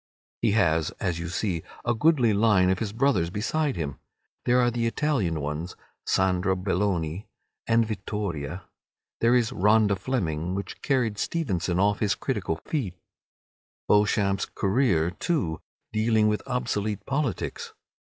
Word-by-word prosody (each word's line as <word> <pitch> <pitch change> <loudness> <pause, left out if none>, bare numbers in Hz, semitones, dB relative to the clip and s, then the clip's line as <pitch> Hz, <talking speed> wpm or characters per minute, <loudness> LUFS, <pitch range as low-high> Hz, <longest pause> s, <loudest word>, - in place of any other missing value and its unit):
He 110 -3 +2
has, 80 -7 +2
as 90 -3 -1
you 85 0 -4
see, 90 -1 -1 0.2
a 120 - +2
goodly 125 -3 +3
line 100 -3 +4
of 95 - 0
his 110 -3 -2
brothers 110 -8 +2
beside 130 - -1
him. 70 -4 -4 0.5
There 125 +1 +4
are 120 -1 +3
the 115 0 0
Italian 115 - 0
ones, 75 +5 -4 0.3
"Sandra 95 0 +2
Belloni," 90 -2 -1 0.4
and 115 0 +4
"Vittoria"; 95 -5 -4 0.6
there 115 +2 +4
is 120 -3 +2
"Rhoda 105 +1 +3
Fleming," 90 -6 -2
which 100 - -6
carried 120 -7 0
Stevenson 95 - -1
off 100 +1 +2
his 100 -4 +1
critical 80 - -2
feet; 120 - -2 0.9
"Beauchamp's 100 -1 +3
Career," 95 -6 +1
too, 95 - -1 0.3
dealing 110 0 +3
with 105 0 +1
obsolete 110 -5 -2
politics. 135 -5 -2
105 Hz, 130 wpm, -26 LUFS, 90-115 Hz, 0.9 s, line